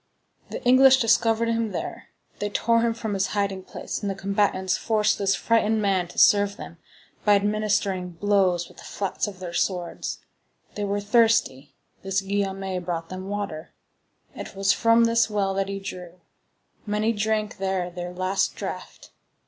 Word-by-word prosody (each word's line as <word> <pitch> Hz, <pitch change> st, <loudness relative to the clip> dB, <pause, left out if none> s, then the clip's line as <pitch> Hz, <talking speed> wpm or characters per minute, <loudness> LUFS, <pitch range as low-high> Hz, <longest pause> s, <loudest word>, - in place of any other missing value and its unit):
The -, -, -6 dB
English 260 Hz, +1 st, +7 dB
discovered 230 Hz, -1 st, +2 dB
him 230 Hz, -2 st, -1 dB
there. -, -, -5 dB, 0.3 s
They 205 Hz, -, -2 dB
tore 230 Hz, +2 st, +2 dB
him 230 Hz, -1 st, +1 dB
from 220 Hz, -2 st, -4 dB
his 195 Hz, 0 st, 0 dB
hiding 200 Hz, -2 st, -1 dB
place, -, -, -6 dB
and 205 Hz, -, -2 dB
the 195 Hz, -, -2 dB
combatants 195 Hz, -1 st, 0 dB
forced 215 Hz, -1 st, +1 dB
this 195 Hz, -1 st, +2 dB
frightened 225 Hz, 0 st, +2 dB
man 195 Hz, -4 st, +1 dB
to -, -, -15 dB
serve 205 Hz, -1 st, +4 dB
them, 165 Hz, -, -10 dB, 0.4 s
by 205 Hz, -1 st, +5 dB
administering 200 Hz, -3 st, 0 dB
blows 185 Hz, -2 st, +1 dB
with -, -, -19 dB
the -, -, -12 dB
flats 200 Hz, +1 st, -3 dB
of 200 Hz, -2 st, -8 dB
their 180 Hz, -2 st, -6 dB
swords. 175 Hz, -1 st, -2 dB, 0.6 s
They 205 Hz, -, -3 dB
were 205 Hz, 0 st, -1 dB
thirsty; 205 Hz, -, +2 dB, 0.3 s
this 195 Hz, 0 st, -1 dB
Guillaume 195 Hz, -2 st, -2 dB
brought 165 Hz, -1 st, -4 dB
them 185 Hz, +1 st, -7 dB
water. 200 Hz, -6 st, -5 dB, 0.6 s
It -, -, -8 dB
was 195 Hz, 0 st, +3 dB
from 230 Hz, +1 st, +4 dB
this 230 Hz, 0 st, +3 dB
well 200 Hz, -2 st, 0 dB
that 195 Hz, 0 st, -1 dB
he 195 Hz, 0 st, -4 dB
drew 195 Hz, -2 st, -6 dB
it. 175 Hz, +1 st, -18 dB, 0.7 s
Many 210 Hz, +2 st, +1 dB
drank 215 Hz, 0 st, -1 dB
there 190 Hz, -2 st, -2 dB
their 175 Hz, 0 st, -6 dB
last 185 Hz, +2 st, -1 dB
draught. -, -, -7 dB
200 Hz, 165 wpm, -25 LUFS, 190-215 Hz, 0.7 s, English